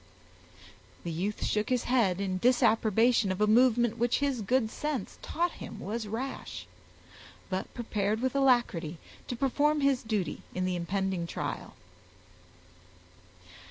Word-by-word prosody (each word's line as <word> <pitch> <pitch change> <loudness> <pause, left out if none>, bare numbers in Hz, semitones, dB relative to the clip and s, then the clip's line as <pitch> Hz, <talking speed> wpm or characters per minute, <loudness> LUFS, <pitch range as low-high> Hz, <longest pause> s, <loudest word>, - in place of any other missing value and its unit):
The 170 - -3
youth 190 +6 -2
shook 210 0 0
his 250 -2 +1
head 220 -8 +2
in 190 -2 -1
disapprobation 225 -2 +3
of 185 - -3
a 210 - +4
movement 240 +1 +4
which 240 0 +2
his 280 -4 0
good 225 +1 +1
sense 295 -9 -4
taught 345 +2 -1
him - - -7
was 220 +3 -4
rash, 245 +6 -5 0.9
but 185 0 -2
prepared 215 -3 -1
with 260 +1 0
alacrity 240 - +2 0.3
to 245 - -3
perform 290 +4 +2
his 275 -2 +3
duty 215 -5 -2
in 185 0 0
the 185 -1 0
impending 185 0 -1
trial. - - -5
225 Hz, 130 wpm, -29 LUFS, 190-255 Hz, 0.9 s, a